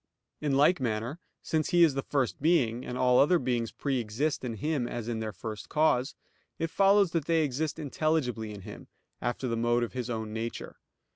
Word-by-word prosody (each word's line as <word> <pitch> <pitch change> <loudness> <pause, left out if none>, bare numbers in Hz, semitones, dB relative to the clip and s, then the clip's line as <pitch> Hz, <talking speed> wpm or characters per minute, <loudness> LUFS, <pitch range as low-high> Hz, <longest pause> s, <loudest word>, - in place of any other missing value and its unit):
In 145 -3 0
like 150 +5 +4
manner, 120 +5 -2 0.2
since 155 -2 0
He 175 -1 +5
is 160 -4 +5
the 135 - -1
First 135 -3 -1
Being, 130 -7 +2
and 125 - -5
all 125 0 +4
other 175 +6 +5
beings 120 -5 -1
pre 135 -3 -1
exist 120 +8 -2
in 120 -3 -3
Him 140 +2 -1
as 120 -2 -5
in 115 -2 -2
their 110 -1 -3
First 105 +3 -7
Cause, 150 -4 +2 0.4
it 165 0 -2
follows 195 -2 +4
that 165 -4 -1
they 165 -1 +2
exist 150 +3 -2
intelligibly 140 -7 -1
in 100 -1 -8
Him, - - -10 0.3
after 120 +2 -2
the 115 - -1
mode 120 +1 +2
of 120 - -4
His 125 -1 -4
own 110 -2 -3
Nature. 115 +1 -5
130 Hz, 200 wpm, -29 LUFS, 115-155 Hz, 0.4 s, He